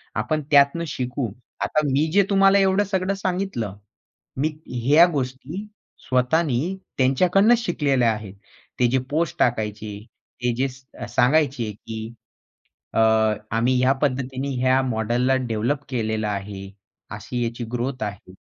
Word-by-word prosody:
आपण 155 -1 -1
त्यातनं 140 +3 +5
शिकू. 125 -4 -3 0.3
आता - - +1
मी 140 +4 +2
जे 200 +3 +5
तुम्हाला 195 0 +5
एवढं 195 +1 +3
सगळं 190 -1 -1
सांगितलं, 185 - -3 0.6
मी 150 +4 +1 0.4
ह्या 150 +6 +7
गोष्टी 140 +7 -4 0.4
स्वतःनी 140 +5 +1 0.2
त्यांच्याकडनंच 180 - +4
शिकलेल्या 135 - +2
आहेत. 105 -3 -6 0.5
ते 125 - +4
जे 130 - +3
पोस्ट 160 +3 -1
टाकायचे, 105 -3 -1 0.4
ते 120 -1 +2
जे 130 +3 +1
स 130 +1 -15
अ, 120 - -5
सांगायचे 125 -1 +2
की 110 +2 -7 0.9
अ, - - +1 0.5
आम्ही 115 +3 +2
ह्या 130 +1 +4
पद्धतीने 130 -1 -1
या 130 +1 +3
मॉडेलला 120 +1 +1
डेव्हलप 120 +6 -1
केलेलं 110 -4 -1
आहे, 100 -1 -4 0.5
अशी 120 +4 -4
याची 115 +1 -3
ग्रोथ 125 0 -2
आहे. 100 -3 -7
130 Hz, 130 wpm, -23 LUFS, 115-155 Hz, 0.9 s, ह्या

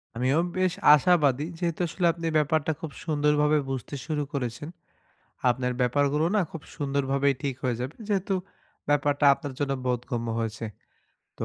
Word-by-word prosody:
আমিও 130 +6 +2 0.2
বেশ 185 -2 +2 0.2
আশাবাদী, 150 -3 +3
যেহেতু 170 -1 -2
আসলে 180 +2 -2
আপনি 165 +1 -7
ব্যাপারটা 155 +1 +1
খুব 160 -3 -6
সুন্দরভাবে 150 -1 +2
বুঝতে 135 +1 -4
শুরু 150 -2 -1
করেছেন। 130 +2 -3 0.8
আপনার 125 0 -1
ব্যাপারগুলো 145 +4 +2
না - - +4
খুব 165 - -8
সুন্দরভাবেই 140 -1 +1
ঠিক 140 -2 -1
হয়ে 125 -2 0
যাবে, 130 +5 -4
যেহেতু 195 -1 0 0.5
ব্যাপারটা 145 0 +2
আপনার 140 0 -7
জন্য 140 -1 0
বোধগম্য 120 -1 -2
হয়েছে। 115 0 -3 0.7
তো, - - -2
145 Hz, 140 wpm, -26 LUFS, 130-155 Hz, 0.8 s, না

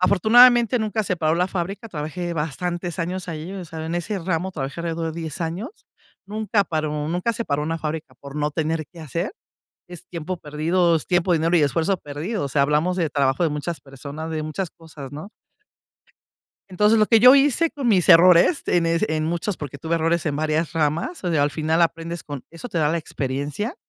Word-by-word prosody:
afortunadamente 240 +6 +6
nunca 220 0 -1
se 185 - -1
paró 160 -1 +1
la 180 +1 +2
fábrica, 195 +4 -4
trabajé 170 +1 -4
bastantes 170 +3 -3
años 180 +2 -3
ahí, 165 +2 -5
o 190 -2 -6
sea, 160 -1 -7
en 165 - -3
ese 195 +4 -2
ramo, 180 +1 -2
trabajé 140 -2 -5
alrededor 165 -1 -3
de 170 - -6
10 160 -1 -5
años. 175 - -3 0.6
Nunca 215 0 0
paró, 155 -2 -2
nunca 180 +7 0
se 230 +1 -4
paró 145 -4 -1
una 165 +2 -2
fábrica 155 -3 -5
por 140 +3 -11
no 150 0 0
tener 160 +1 -1
qué 170 - -12
hacer, 165 +4 -3 0.6
es 175 0 -11
tiempo 175 +2 -5
perdido, 165 +3 +1
es 160 - -2
tiempo, 180 0 +2
dinero 165 +1 +2
y - - +3
esfuerzo 160 +6 +1
perdido, 155 +6 -4
o - - -2
sea, 140 +1 +1
hablamos 150 +6 +1
del 165 -5 0
trabajo 135 +2 +1
de 165 - +2
muchas 150 +3 -4
personas, 140 +4 -8
de 155 -1 -2
muchas 155 +4 -4
cosas, 150 -5 -11
¿no? 155 +8 -8 1.4
Entonces, 210 +4 +3
lo 215 - +4
que 225 - +5
yo 250 +4 +9
hice 285 +4 +4
con 280 -5 -2
mis 190 -6 +3
errores, 180 - +7
en 170 -1 +2
es 165 +3 +1
en 155 0 -1
muchos, 170 +4 -2
porque 145 -2 -7
tuve 160 +4 -1
errores 165 +1 +1
en 150 -3 -1
varias 155 +1 0
ramas, 165 - -1
o 180 - 0
sea, 155 -4 +2
al 145 - +1
final, 160 +2 +1
aprendes 165 0 -1
con 145 -3 -7
eso 165 +9 -9
te 180 - -2
da 150 -2 +2
la 165 - 0
experiencia. 145 - -3
165 Hz, 205 wpm, -23 LUFS, 155-185 Hz, 1.4 s, yo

